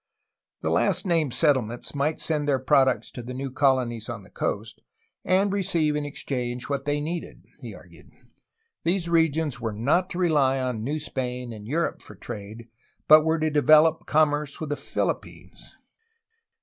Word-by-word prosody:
The - - -1
last - - +1
named 165 -6 +1
settlements 125 -6 0
might 145 +2 -1
send 150 -2 -1
their 140 -2 +3
products 130 0 +2
to 125 - -7
the 125 +2 -7
new 135 0 -4
colonies 125 -5 +1
on 115 -4 -6
the 95 - -18
coast, 110 +2 -4 0.4
and 195 +2 +2
receive 170 -6 +1
in 150 -1 -2
exchange 125 -3 -4
what 140 -1 -3
they 145 0 0
needed, 165 +4 -5
he - - -8
argued. - - -16 0.7
These 175 0 +1
regions 160 -5 +1
were 115 -2 -2
not 145 - +1
to - - -6
rely 145 -7 +2
on 125 -4 -2
New 150 +6 -2
Spain 125 -4 -4
and 105 -1 -10
Europe 165 +6 -1
for - - -13
trade, 110 +3 -8 0.4
but 155 0 +8
were 160 +1 +1
to 155 0 0
develop 155 +2 +4
com 155 0 +4
merce 145 -1 -4
with 155 -2 -5
the - - +1
Philippines. - - -5
145 Hz, 165 wpm, -25 LUFS, 125-155 Hz, 0.7 s, but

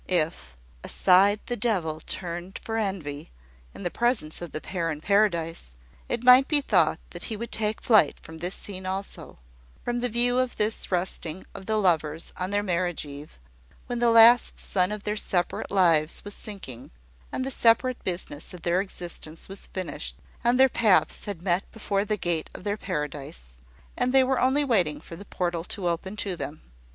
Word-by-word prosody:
If 155 - 0 0.3
"aside 195 +3 +4
the 245 - -2
devil 185 -9 0
turned 175 +1 -4
for 225 0 -3
envy" 180 -9 -3 0.4
in - - -10
the 175 - -1
presence 235 -12 0
of 175 - -6
the - - -4
pair 170 -1 -3
in 150 -2 -3
Paradise, 170 - +1 0.4
it 240 0 -2
might 250 +2 +8
be 300 - +3
thought 280 - +2
that - - -6
he 220 - -4
would 235 +2 -6
take 215 0 0
flight 215 - +4
from 160 0 -11
this 180 +3 -2
scene 190 -2 -7
also; 195 +1 -4 0.5
from 240 0 -1
the 245 +1 -1
view 245 +2 +2
of 255 -1 -1
this 210 -1 0
resting 180 -1 -2
of 190 - -10
the 220 0 +1
lovers 165 -5 0
on 185 +1 -3
their 205 +1 0
marriage 175 -4 -1
eve, 145 - -10 0.5
when 240 -1 -3
the 240 0 +4
last 230 +1 +7
sun 185 0 +1
of 210 -1 -5
their 210 - -1
separate 180 -4 -1
lives 165 -5 +3
was 205 - -4
sinking, 185 - -8 0.4
and 260 - -2
the 270 - -1
separate 245 +1 +3
business 175 -3 -4
of 175 - -12
their 175 +2 +2
existence 170 -4 -6
was 195 0 -5
finished, 185 -2 -5 0.3
and 240 +2 +3
their 265 - +8
paths 220 -6 +3
had 200 -5 -5
met 180 +1 0
before 200 -2 -1
the 215 0 0
gate 175 -4 -1
of - - -9
their 205 0 -1
paradise, 135 - -6 0.4
and 250 - 0
they 265 - +7
were 260 0 +1
only 270 +3 +3
waiting 180 - +2
for 165 - -10
the 200 +4 -10
portal 175 -3 -2
to 180 +1 -3
open 175 +4 -2
to 200 -3 -2
them. 145 -1 -6
190 Hz, 185 wpm, -26 LUFS, 165-220 Hz, 0.5 s, might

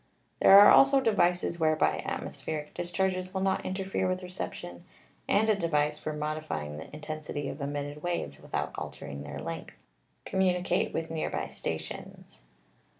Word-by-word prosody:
There 195 - +9
are 205 - +10
also 275 0 +7
devices 180 -7 +2
whereby 155 -1 +2
atmospheric 150 -1 -4
discharges 185 +1 -1
will 190 - 0
not 190 0 +1
interfere 190 0 -1
with 185 0 -2
reception, 180 - -6 0.5
and 215 +2 +4
a 215 - +5
device 150 -5 0
for 155 - -3
modify 155 - -3
ing 75 0 -7
the 80 - -9
intensity 150 -1 -5
of 145 - -7
emitted 145 +1 -4
waves 175 +1 -3
without - - -3
altering 70 0 -7
their 75 0 -7
length - - -7 0.4
communicate 185 -1 +1
with 165 0 -3
near 160 -1 -1
by - - -3
stations. - - -7
165 Hz, 150 wpm, -29 LUFS, 150-190 Hz, 0.5 s, are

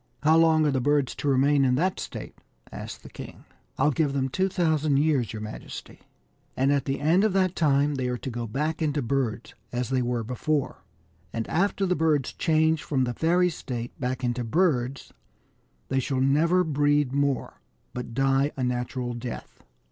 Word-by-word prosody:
" - - -31
How 155 +2 +5
long 160 -1 +4
are 150 - +2
the 130 -1 0
birds 145 -1 +1
to - - -5
remain 140 +1 +3
in 125 -1 +3
that 180 +7 0
state - - -7 0.2
?" - - -26
asked - - -8
the - - -11
king. - - -10 0.2
" - - -40
I'll 150 - +3
give 145 -2 0
them 135 -1 0
2,000 160 -4 +1
years, 140 -6 +2
your 110 -1 -6
majesty; 110 - -8 0.6
and 135 +2 +3
at 140 -2 +1
the 135 0 -2
end 165 +7 +3
of 215 -3 +2
that 185 -2 +2
time 145 -2 +2
they 130 -2 -2
are 125 0 -2
to 130 - -6
go 120 0 -4
back 150 +8 -2
into 145 -3 0
birds, 120 -3 -2 0.2
as 125 0 -2
they 130 -1 +1
were 120 -1 -1
before. 125 -1 -2 0.5
And 115 -1 -3
after 195 +3 +1
the 180 -1 +1
birds 150 -4 +1
change 160 -1 +2
from 135 -3 0
the 120 -1 -1
fairy 175 +5 +2
state 120 -6 -5
back 130 0 -3
into 120 0 -1
birds, 135 -2 0 0.8
they 135 - +1
shall 130 0 -1
never 160 +7 +3
breed 145 -3 +1
more, 140 -1 -1 0.3
but 125 -2 -6
die 135 +2 +2
a 130 - -1
natural 125 0 -2
death." 120 0 -7
140 Hz, 190 wpm, -26 LUFS, 125-155 Hz, 0.8 s, How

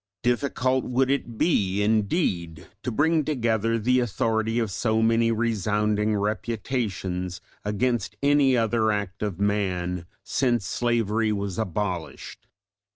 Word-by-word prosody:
Difficult 130 +1 +1
would 130 +2 +1
it 120 -5 -2
be 100 - +2
indeed 100 - 0 0.2
to 125 - -3
bring 155 +6 +2
together 115 -5 0
the 125 +3 +2
authority 115 -1 0
of 115 -4 0
so 110 +3 0
many 115 0 +3
resounding 105 -1 +1
reputations 100 -4 -2 0.2
against 115 +4 -1
any 140 -2 +4
other 115 -1 +2
act 105 -1 -3
of 100 -4 -3
man, 90 -4 -1 0.2
since 120 -6 0
slavery 115 0 0
was 100 -1 -3
abolished. 95 -5 -4
110 Hz, 115 wpm, -25 LUFS, 100-120 Hz, 0.2 s, any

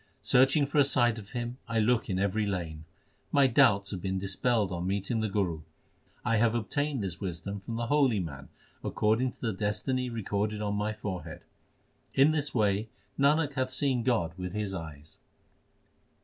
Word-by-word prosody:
Searching 135 +3 +4
for 145 +2 0
a - - +8
sight 120 -4 +2
of 105 +2 -12
Him 120 0 -4
I 115 -1 -2
look 115 +1 +2
in 95 - 0
every 100 +2 0
lane. 80 -5 -4 0.5
My 140 -1 +5
doubts 115 -7 +4
have 95 -3 -4
been 95 0 -2
dispelled 100 +2 0
on 90 0 -3
meeting 100 +4 -1
the 110 -1 0
Guru. 95 -6 -1 0.6
I 115 +1 +2
have 115 +1 +3
obtained 140 +2 -1
this 90 -3 -5
wisdom 95 +2 -4
from 115 +4 -6
the 120 +1 -2
holy 135 -4 +3
man 70 -6 -6 0.3
according 115 +4 +1
to - - -28
the 115 -3 -1
destiny 125 +6 -1
recorded 105 -2 -2
on 105 -1 -1
my 105 +1 -1
forehead. 90 -6 -6 0.7
In 140 +3 +6
this 145 -2 -1
way 105 -1 +1 0.3
Nanak 145 +1 +3
hath 130 -2 -1
seen 130 -2 +1
God 110 -10 +1
with 90 0 -4
his 105 -2 -2
eyes. 80 -4 -8
110 Hz, 175 wpm, -29 LUFS, 95-125 Hz, 0.7 s, a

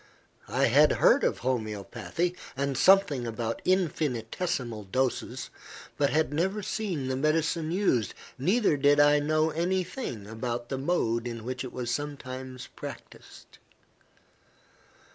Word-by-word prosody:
I - - +2
had - - +5
heard - - +4
of - - 0
homoeopathy, 120 - -2 0.2
and 140 0 -1
something 150 -6 +4
about 115 0 -3
infinitesimal 135 - -1
doses, 130 +3 -2 0.4
but 140 -1 +2
had 155 -1 +1
never 190 +7 0
seen 190 -10 -2
the 130 - -1
medicine 155 +3 +1
used, 175 - +1 0.2
neither 180 - +2
did 145 +1 +4
I 145 0 +6
know 155 +2 +1
any 180 +4 0
thing 175 - -6
about 120 +2 -4
the 135 - -2
mode 120 -6 0
in 115 -2 -6
which 125 +2 -4
it 130 - -6
was 120 -2 -3
sometimes 130 -2 -5
practised. - - -11
140 Hz, 125 wpm, -28 LUFS, 120-165 Hz, 0.4 s, I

